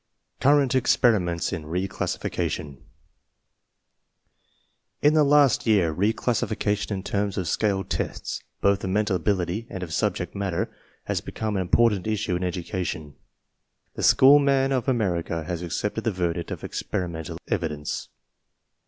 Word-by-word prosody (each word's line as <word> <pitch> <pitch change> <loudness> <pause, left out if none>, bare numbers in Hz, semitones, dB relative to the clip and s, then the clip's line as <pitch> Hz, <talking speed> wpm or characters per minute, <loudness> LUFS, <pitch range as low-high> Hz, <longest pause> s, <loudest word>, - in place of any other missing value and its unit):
CURRENT 140 -1 +4
EXPERIMENTS 105 -10 +2
IN 80 -4 -5
RE 90 +4 -1
CLASSIFICATION 70 -6 -3 2.2
In 150 +1 +6
the 155 -1 +5
last 140 -4 +4
year 100 -7 +4
re 100 +7 +1
classification 105 -3 -1
in 95 - -5
terms 100 -1 -1
of 90 -3 -2
scaled 95 +2 0
tests, - - -3 0.2
both 100 0 +2
of 95 - -2
mental 105 0 +1
ability 95 +3 -1
and 95 - -5
of 80 -3 -6
subject - - -1
matter, 95 -4 -2 0.3
has - - -2
"Become 110 -1 -4
an 95 - +1
important 105 +2 +2
issue 105 -3 -1
in 90 - -2
education. 90 -4 -4 0.8
The - - -6
school 140 +2 +7
man 135 -1 +2
of 130 0 0
America 90 -9 0
has 85 +1 -4
accepted 105 +5 -3
the 115 - +2
verdict 85 -2 -2
of - - -5
experimen 85 -3 -4
tal - - -6
evidence. 75 -3 -3
100 Hz, 140 wpm, -25 LUFS, 85-115 Hz, 2.2 s, school